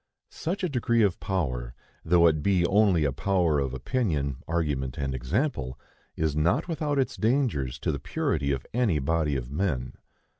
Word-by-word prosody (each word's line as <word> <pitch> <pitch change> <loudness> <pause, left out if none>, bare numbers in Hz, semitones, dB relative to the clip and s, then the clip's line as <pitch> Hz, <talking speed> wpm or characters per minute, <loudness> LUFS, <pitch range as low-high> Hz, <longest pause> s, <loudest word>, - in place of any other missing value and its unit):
Such 185 +5 -3
a - - +2
degree 120 -5 +2
of 100 -4 +1
power, 65 -10 -2 0.3
though 85 +1 +4
it 80 -2 +3
be 90 +1 +2
only 95 -3 +4
a 70 - +1
power 85 -1 +1
of 70 -2 -1
opinion, 70 - -1
argument 75 -6 -1
and 70 -1 -2
example, 65 - -1 0.4
is 80 -2 0
not 80 - +2
without 150 -3 -1
its 135 - 0
dangers 110 - 0
to - - -1
the - - -3
purity 70 -3 -1
of 65 -2 -2
any 115 -9 +2
body 75 +1 0
of 65 -1 -4
men. 75 -6 -1
80 Hz, 165 wpm, -27 LUFS, 70-105 Hz, 0.4 s, though